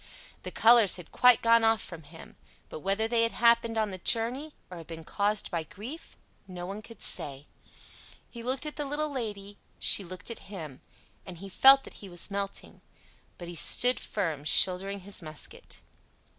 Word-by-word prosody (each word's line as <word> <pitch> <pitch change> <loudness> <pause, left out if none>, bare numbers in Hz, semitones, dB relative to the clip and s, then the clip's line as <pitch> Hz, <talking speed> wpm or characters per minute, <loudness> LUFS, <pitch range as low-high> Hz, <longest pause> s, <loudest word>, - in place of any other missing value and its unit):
The - - -7
colors 225 -3 +5
had 180 -3 -11
quite 250 -2 +4
gone 230 0 +4
off 225 0 +3
from 170 -2 -10
him; 160 +2 -15 0.3
but - - -8
whether 200 +6 -1
that 235 - -4
had 230 0 0
happened 235 -1 +2
on 215 -2 -1
the 185 - -8
journey, 245 - 0 0.2
or 180 - -8
had 165 - -12
been 165 -1 -9
caused 205 +4 -2
by 170 -2 -2
grief, 230 - -11 0.3
no 180 -2 -8
one 200 +3 -7
could 230 +1 -13
say. 140 0 -2 0.8
He 235 - -11
looked 260 +4 -3
at 300 - -6
the 295 - -3
little 295 +2 -3
Lady, 205 -6 -6 0.2
she 200 - +6
looked 185 +5 -8
at 225 - -10
him, 155 -10 -9 0.4
and 185 -3 -11
he 195 +3 -10
felt 270 +6 +6
that - - -13
he 200 - -10
was 175 +3 -5
melting; 200 0 -6 0.6
but 175 - -9
he 175 - -8
stood 245 +8 +2
firm, 165 -8 -4
shouldering 190 +5 +3
his 195 +1 -6
musket. 155 -2 -7
200 Hz, 185 wpm, -28 LUFS, 180-235 Hz, 0.8 s, she